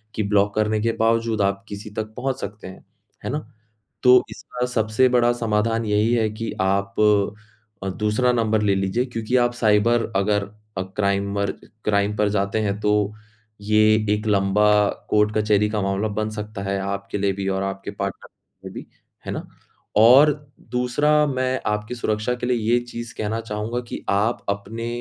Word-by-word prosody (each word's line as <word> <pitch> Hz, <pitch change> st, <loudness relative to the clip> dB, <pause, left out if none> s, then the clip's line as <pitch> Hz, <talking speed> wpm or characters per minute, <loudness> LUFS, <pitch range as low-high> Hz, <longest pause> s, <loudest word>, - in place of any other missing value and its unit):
कि 110 Hz, -, 0 dB
ब्लॉक 100 Hz, 0 st, +2 dB
करने 110 Hz, 0 st, +1 dB
के 115 Hz, +1 st, +1 dB
बावजूद 115 Hz, -1 st, +1 dB
आप 100 Hz, 0 st, 0 dB
किसी 105 Hz, +1 st, -7 dB
तक 110 Hz, 0 st, -5 dB
पहुँच 135 Hz, +1 st, -2 dB
सकते 105 Hz, 0 st, -7 dB
हैं। 95 Hz, -, -12 dB, 0.4 s
है -, -, -2 dB
ना? 145 Hz, -, -1 dB, 0.6 s
तो 125 Hz, 0 st, +7 dB
इसका 125 Hz, 0 st, -4 dB
सबसे 115 Hz, +1 st, +2 dB
बड़ा 120 Hz, -1 st, +3 dB
समाधान 115 Hz, -1 st, 0 dB
यही 105 Hz, +2 st, +2 dB
है 110 Hz, -2 st, +2 dB
कि 110 Hz, +2 st, -5 dB
आप 100 Hz, +1 st, 0 dB, 0.9 s
अ, -, -, -2 dB
दूसरा 105 Hz, +6 st, +1 dB
नंबर 110 Hz, -3 st, +1 dB
ले 100 Hz, -2 st, +3 dB
लीजिए 95 Hz, +5 st, 0 dB
क्योंकि 115 Hz, 0 st, -2 dB
आप 120 Hz, -1 st, +3 dB
साइबर 115 Hz, +1 st, +2 dB
अगर 100 Hz, +1 st, +2 dB, 0.4 s
अ, -, -, 0 dB
क्राइमर 100 Hz, +1 st, -1 dB, 0.3 s
क्राइम 105 Hz, 0 st, +1 dB
पर 105 Hz, -1 st, +2 dB
जाते 100 Hz, +1 st, 0 dB
हैं, 100 Hz, -1 st, -1 dB
तो 105 Hz, 0 st, +1 dB, 0.5 s
ये 105 Hz, +1 st, +3 dB, 0.3 s
एक 105 Hz, +1 st, -4 dB
लंबा 105 Hz, 0 st, +3 dB, 0.4 s
कोर्ट-कचहरी 105 Hz, 0 st, +2 dB
का 105 Hz, -1 st, -1 dB
मामला 100 Hz, +2 st, 0 dB
बन 110 Hz, +1 st, -2 dB
सकता 105 Hz, -1 st, -6 dB
है, 100 Hz, 0 st, -1 dB
आपके 100 Hz, +1 st, -4 dB
लिए 100 Hz, 0 st, +1 dB
भी 95 Hz, 0 st, -4 dB
और 95 Hz, 0 st, -1 dB
आपके 95 Hz, 0 st, -4 dB
पार्टनर 100 Hz, -1 st, -5 dB
के -, -, -15 dB
लिए -, -, -13 dB
भी। -, -, -18 dB, 0.4 s
है -, -, -3 dB
ना? -, -, -5 dB, 0.5 s
और 125 Hz, +8 st, +7 dB, 0.4 s
दूसरा, 145 Hz, +5 st, +2 dB
मैं 130 Hz, -2 st, -1 dB
आपकी 105 Hz, +3 st, -2 dB
सुरक्षा 110 Hz, -1 st, -1 dB
के 125 Hz, -, -4 dB
लिए 125 Hz, 0 st, +1 dB, 0.2 s
ये 120 Hz, -, +5 dB
चीज़ 120 Hz, -1 st, -7 dB
कहना 110 Hz, +1 st, -2 dB
चाहूँगा 115 Hz, +2 st, -3 dB
कि -, -, -7 dB
आप 105 Hz, +4 st, 0 dB
अपने 100 Hz, +3 st, -3 dB
105 Hz, 175 wpm, -22 LUFS, 100-115 Hz, 0.9 s, तो